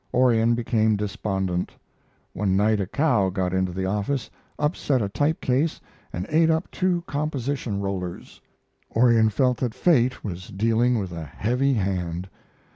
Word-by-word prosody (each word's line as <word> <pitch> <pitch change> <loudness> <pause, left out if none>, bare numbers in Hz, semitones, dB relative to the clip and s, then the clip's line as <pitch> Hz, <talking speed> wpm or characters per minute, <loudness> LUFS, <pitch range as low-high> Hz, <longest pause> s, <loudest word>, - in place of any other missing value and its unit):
Orion 120 -2 +4
became 110 -2 +1
despondent. 100 -3 -2 0.6
One 95 -1 0
night 105 +1 +3
a 95 - -1
cow 120 - +2
got 95 -1 -2
into 95 -1 0
the 95 +1 -3
office, 105 +7 -2 0.3
upset 150 -3 0
a 105 - 0
typecase, 145 +5 0 0.3
and 90 +2 -4
ate 160 +1 +4
up 160 +2 0
two 180 -2 0
composition 140 -7 -2
rollers. 95 -3 -5 0.5
Orion 115 -2 +5
felt 125 +4 +1
that 120 -2 -2
fate 130 -4 +2
was 90 -3 -6
dealing 115 +4 +1
with 95 -4 -3
a 85 -1 -5
heavy 125 - 0
hand. 90 -3 -2
110 Hz, 140 wpm, -24 LUFS, 95-130 Hz, 0.6 s, Orion